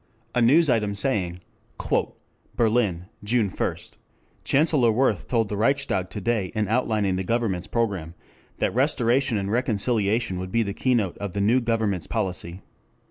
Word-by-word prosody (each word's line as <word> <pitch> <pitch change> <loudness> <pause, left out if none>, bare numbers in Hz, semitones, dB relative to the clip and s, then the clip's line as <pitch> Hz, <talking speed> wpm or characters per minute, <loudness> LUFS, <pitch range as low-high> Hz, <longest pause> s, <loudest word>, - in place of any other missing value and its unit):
] 115 0 -39
A 125 - +1
news 150 +8 +5
item 105 -5 +1
saying: 95 -7 -1 1.1
"Berlin, 110 -7 +1 0.2
June 110 -1 +1
1, - - -1 0.7
Chancellor 140 -5 +3
Wirth 110 -4 +1
told 115 -3 +1
the 105 - -4
Reichstag 110 -5 0
to 105 - -6
day 105 -3 -1
in 105 -1 0
outlining 105 -4 +1
the 95 - -2
Government's 105 -4 -1
program 95 -8 -2 0.4
that - - 0
'restoration 125 -2 +2
and 100 0 -2
reconciliation 110 -3 0
would 95 0 -6
be 115 +2 +2
the 100 -2 -4
keynote 115 -7 0
of 100 -3 -5
the 100 - -1
new 115 +6 +3
Government's 110 -6 -1
policy.' 90 -1 -3
110 Hz, 150 wpm, -24 LUFS, 95-120 Hz, 1.1 s, news